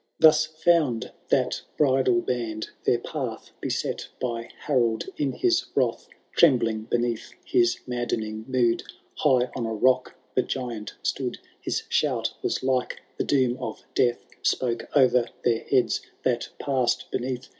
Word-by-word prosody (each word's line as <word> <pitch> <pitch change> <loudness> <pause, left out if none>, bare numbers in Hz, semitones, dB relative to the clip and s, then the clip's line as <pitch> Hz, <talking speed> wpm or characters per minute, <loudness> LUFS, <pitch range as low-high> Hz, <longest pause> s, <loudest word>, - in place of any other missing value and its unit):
—. - - -52
Thus 155 0 +6
found 155 -6 +2 0.2
that - - +2 0.2
bridal 130 -4 +3
band 115 -4 -3 0.2
their 120 - +4
path 120 -3 -5
Beset - - -2
by 115 -2 -3
Harold 120 -6 +1
in 140 -2 0
his 355 -2 +2
wrath. 475 - +1 0.3
Trembling 115 -8 +4
beneath 120 -1 -1
his 120 0 +3
nwddening 110 -3 -3
mood, 125 -3 +2 0.4
High 130 -4 +3
on 115 - -2
a 110 - -2
rock 130 +3 +2 0.2
the 130 - +3
giant 120 -5 -4
stood; - - -1 0.2
His - - -2
shout - - +1
was - - -1
like 130 -1 0 0.2
the - - +2
doom 130 -3 +2
of - - -5
death 120 -1 +2 0.2
Spoke 120 -2 0
o*er 125 -3 +5 0.2
their 115 -2 +1
heads 125 -5 +2 0.2
that 120 -2 0
passed 130 -3 0
beneath. 125 0 -3
125 Hz, 140 wpm, -26 LUFS, 115-130 Hz, 0.4 s, Thus